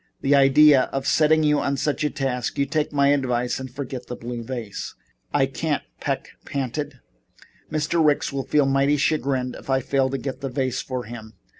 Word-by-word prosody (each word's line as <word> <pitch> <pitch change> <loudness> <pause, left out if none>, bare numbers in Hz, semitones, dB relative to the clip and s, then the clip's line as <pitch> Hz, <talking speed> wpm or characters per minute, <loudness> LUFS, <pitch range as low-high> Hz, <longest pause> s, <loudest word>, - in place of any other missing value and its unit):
"The 135 - +2
idea 140 0 +6
of 135 0 -3
setting 155 +2 +4
you 150 -1 +3 0.2
such 150 +2 -1
a 150 - +2
task. 135 -4 -2
You 140 - +2
take 150 +1 -1
my 140 -1 +3
advice 125 -4 0
and 130 0 -6
forget 130 -1 -6
the 125 - -5
blue 120 0 -6
vase." 115 -4 -6 0.4
"I - - +3
can't," - - -2 0.2
Peck - - -3
panted. 140 0 -4 0.7
"Mr. 155 +2 +1
Ricks 150 -2 +2
will 135 -1 -3
feel 150 -2 +3
mighty 135 +2 +2
chagrined 135 -4 0
if - - -15
I 135 0 +3
fail 135 0 +1
to 135 - -2
get 135 0 -5
the 135 - -3
vase 130 -1 -2
to 130 -1 -3
him. 110 -1 -9
135 Hz, 185 wpm, -23 LUFS, 125-145 Hz, 0.7 s, idea